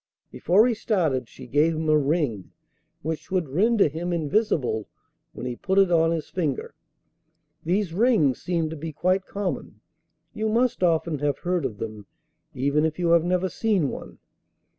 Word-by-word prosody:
Before 195 +7 +3
he 250 - +2
started 160 - 0
she 130 - -12
gave 150 +6 +2
him 155 0 -2
a 155 - +4
ring 145 - 0 0.5
which 160 +1 -4
would 185 -4 0
render 205 - +3
him 165 +4 -4
invisible 155 - 0 0.4
when - - -8
he 125 -1 -3
put 190 +9 -2
it 195 -2 +5
on 165 -1 +4
his 165 -2 -2
finger. 155 -5 -3 0.9
These 180 +1 0
rings 195 - +3
seem 165 -3 -1
to - - -5
be 160 +1 -6
quite 185 +5 0
common; 190 - -4 0.5
you 220 0 -1
must 240 +1 +1
often 165 -3 +1
have 145 -1 0
heard 180 -4 -1
of 110 -6 -4
them, 105 -2 -7 0.5
even 140 +4 +1
if 160 -1 0
you 175 -2 +1
have 170 -1 +5
never 180 +1 +1
seen 190 -6 0
one. - - -8
165 Hz, 165 wpm, -25 LUFS, 145-185 Hz, 0.9 s, it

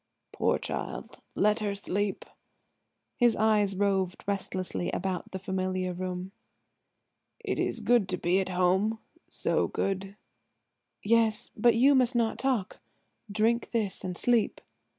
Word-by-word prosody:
"Poor - - +1
child; - - -5 0.2
let 210 +2 +3
her 205 -2 -2
sleep." 200 +1 -2 0.9
His 240 -3 +4
eyes 210 -3 +2
roved 190 -2 0
restlessly 185 -3 -2
about 185 -1 -3
the 190 - -3
familiar 185 -1 -2
room. 185 +1 -4 1.1
"It - - -3
is - - -1
good 235 -6 +3
to 185 - -1
be 180 +2 +2
at 190 - -2
home–so 190 +5 0
good." 195 0 -2 0.9
"Yes–but 225 +1 +2
you 265 +5 +6
must 255 -2 +3
not 230 -2 +1
talk. 250 -8 -1 0.5
Drink 225 +3 +1
this 215 -5 -2
and 180 -2 -4
sleep." 240 -3 +2
200 Hz, 120 wpm, -29 LUFS, 185-225 Hz, 1.1 s, you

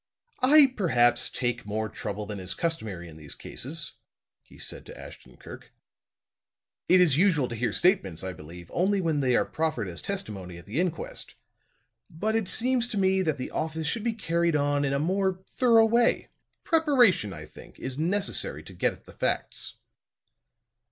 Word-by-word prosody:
"I 275 0 +7
perhaps 125 - +3
take 120 -1 -2
more 110 +2 -2
trouble 105 0 -5
than 105 -1 -6
is 95 0 -3
customary 110 - -3
in 80 -1 -12
these 75 -2 -8
cases," 150 +5 -5 0.5
he - - -19
said - - -5
to - - -10
Ashton - - -12
Kirk. - - -12 1.2
"It 185 - +7
is 160 -7 +4
usual 165 -8 +3
to 120 - -4
hear 120 +2 0
statements, 100 - +1
I 95 -1 -4
believe, 85 +2 -11
only 195 +3 +2
when 165 -5 0
they 130 -3 +2
are - - +3
proffered 155 -10 -2
as 85 -2 -6
testimony 100 - -5
at 85 - -12
the 110 +10 -3
inquest. 180 -2 -3 0.7
But 215 +7 -2
it 225 -4 0
seems 245 0 +1
to 235 -4 -4
me 190 -1 +3
that 155 -5 0
the 130 - -5
office 160 0 -2
should 205 +9 -1
be 230 -1 0
carried 170 -6 0
on 145 0 +1
in 135 - 0
a - - +2
more 190 +4 0
thorough 230 -3 +4
way. 235 +1 +2 0.3
Preparation, 260 - +4
I 75 -4 -8
think, 75 - -15
is 130 +1 -5
necessary 200 - -1
to - - -11
get - - 0
at - - -18
the - - -13
facts." - - -2
160 Hz, 175 wpm, -27 LUFS, -, 1.2 s, I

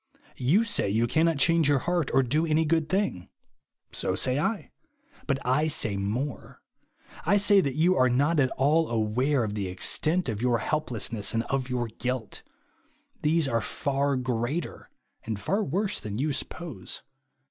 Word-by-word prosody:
You 160 - +3
say 205 - 0
you 110 +4 +2
cannot 160 +5 +2
change 165 +1 +3
your 145 - +4
heart 175 -4 0
or 135 - +4
do 150 +6 +1
any 160 0 +2
good 160 0 +1
thing. 190 - -1 0.6
So 95 - -1
say 130 +8 0
I. 215 +7 -2 0.6
But 140 -2 +1
I 135 +5 +2
say 115 -9 0
more. 110 +8 -4 0.6
I 205 - +3
say 205 -1 +5
that 140 -5 -2
you 170 +4 +3
are 130 -5 +4
not 145 +6 +2
at 130 -2 +3
all 155 +5 +3
aware 120 +5 +1
of 105 -2 -3
the 100 -2 -2
extent 155 - +1
of 110 -4 -2
3^our 120 -1 +1
helplessness 115 -8 -2
and 115 - +1
of 130 -2 -1
your 125 -1 -1
guilt. 120 +1 -4 0.8
These 160 0 +2
are 115 -3 0
far 140 +2 -1
greater 130 +5 -3 0.3
and 110 -2 -4
far 200 - 0
Avorse 195 +7 -1
than 105 -1 -5
you 145 +3 0
suppose. 140 - -6
135 Hz, 165 wpm, -27 LUFS, 115-160 Hz, 0.8 s, say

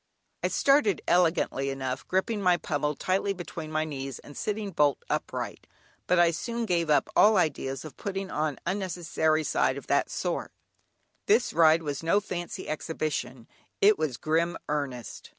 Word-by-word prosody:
I - - +1
started 275 - +3
elegantly 165 -6 +2
enough, 130 -1 -4
gripping 205 +3 0
my 180 -2 +4
pummel 150 -2 -1
tightly 195 +4 0
between 170 -3 -7
my 155 0 0
knees, 135 -3 -5
and 145 - -13
sitting 210 -1 -3
bolt 145 -5 +3
upright, - - -3 0.4
but 180 - +3
I 175 -1 +5
soon 235 +7 -3
gave 170 -5 0
up 145 -2 +3
all 215 0 +6
ideas 140 -5 -1
of 155 - -10
putting 195 -1 -4
on 150 -2 -1
unnecessary 170 -4 0
"side" - - +1
of - - -8
that - - +1
sort; - - -3 0.8
this 430 +2 +3
ride 165 0 +5
was 145 -2 -3
no 165 +5 +3
fancy 175 -4 -5
exhibition, 150 -6 -3 0.3
it 205 -1 +5
was 150 -6 -1
grim 165 +2 0
earnest. 135 -6 -4
160 Hz, 155 wpm, -28 LUFS, 150-190 Hz, 0.8 s, all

